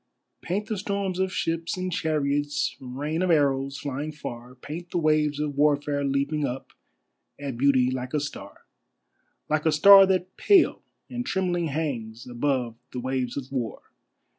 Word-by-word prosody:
Paint 195 Hz, +5 st, -2 dB
the 215 Hz, -4 st, -3 dB
storms 200 Hz, -2 st, -2 dB
of 190 Hz, 0 st, 0 dB
ships 165 Hz, +1 st, -2 dB
and 185 Hz, 0 st, -3 dB
chariots, 145 Hz, -2 st, 0 dB
rain 145 Hz, +6 st, -3 dB
of 185 Hz, -, +1 dB
arrows 140 Hz, -3 st, +2 dB
flying 145 Hz, +1 st, -4 dB
far, 125 Hz, -4 st, -8 dB
Paint 160 Hz, +7 st, -8 dB
the -, -, -2 dB
waves 155 Hz, -2 st, +2 dB
of 150 Hz, -1 st, -1 dB
Warfare 145 Hz, 0 st, +2 dB
leaping 140 Hz, +2 st, 0 dB
up 135 Hz, -1 st, -4 dB, 0.7 s
at 140 Hz, -3 st, -4 dB
Beauty 130 Hz, 0 st, +3 dB
like 130 Hz, +2 st, -4 dB
a -, -, +2 dB
star, 145 Hz, 0 st, -8 dB, 0.8 s
Like 155 Hz, +1 st, 0 dB
a -, -, +4 dB
star 195 Hz, +5 st, +8 dB
that 185 Hz, -1 st, -1 dB
pale 395 Hz, -4 st, +4 dB, 0.3 s
and 245 Hz, 0 st, -4 dB
trembling 180 Hz, -6 st, -1 dB
hangs 125 Hz, -7 st, -4 dB
above 125 Hz, -2 st, -1 dB
the 125 Hz, -, -4 dB
waves 130 Hz, 0 st, -2 dB
of 135 Hz, -1 st, -6 dB
War. 125 Hz, -4 st, -4 dB
145 Hz, 155 wpm, -26 LUFS, 135-170 Hz, 0.8 s, star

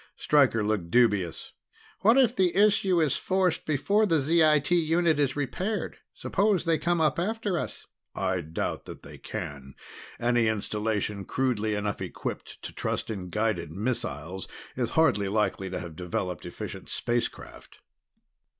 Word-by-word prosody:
Stryker 135 Hz, -7 st, +3 dB
looked 105 Hz, -5 st, -1 dB
dubious. 105 Hz, -7 st, +1 dB, 0.5 s
"What 225 Hz, +5 st, +5 dB
if 250 Hz, -3 st, +4 dB
the 185 Hz, -5 st, +2 dB
issue 195 Hz, -3 st, +4 dB
is 155 Hz, -5 st, +2 dB
forced 185 Hz, -2 st, 0 dB
before 200 Hz, +9 st, +2 dB
the 165 Hz, -4 st, +3 dB
ZIT 155 Hz, 0 st, +3 dB
unit 165 Hz, -2 st, +3 dB
is 140 Hz, -3 st, +1 dB
repaired? 180 Hz, -, -2 dB, 0.2 s
Suppose 200 Hz, -2 st, +1 dB
they 165 Hz, -1 st, +2 dB
come 175 Hz, 0 st, +1 dB
up 160 Hz, +1 st, +2 dB
after 210 Hz, +1 st, -1 dB
us?" 170 Hz, -, -4 dB, 0.3 s
"I 95 Hz, -1 st, 0 dB
doubt 80 Hz, 0 st, -4 dB
that -, -, -10 dB
they -, -, -11 dB
can. 70 Hz, -2 st, -7 dB, 0.4 s
Any 120 Hz, -1 st, +2 dB
installation 105 Hz, -1 st, -1 dB
crudely 110 Hz, -2 st, 0 dB
enough 105 Hz, -1 st, -2 dB
equipped -, -, -6 dB
to -, -, -6 dB
trust -, -, -2 dB
in 95 Hz, -4 st, -5 dB
guided 105 Hz, -6 st, -1 dB
missiles 95 Hz, -, -3 dB, 0.3 s
is 125 Hz, -2 st, -1 dB
hardly 105 Hz, -11 st, +4 dB
likely 100 Hz, -2 st, 0 dB
to 90 Hz, -, -4 dB
have 85 Hz, -3 st, -8 dB
developed 90 Hz, -1 st, -3 dB
efficient -, -, -7 dB
space 120 Hz, 0 st, 0 dB
craft." -, -, -14 dB
125 Hz, 145 wpm, -27 LUFS, -, 0.5 s, What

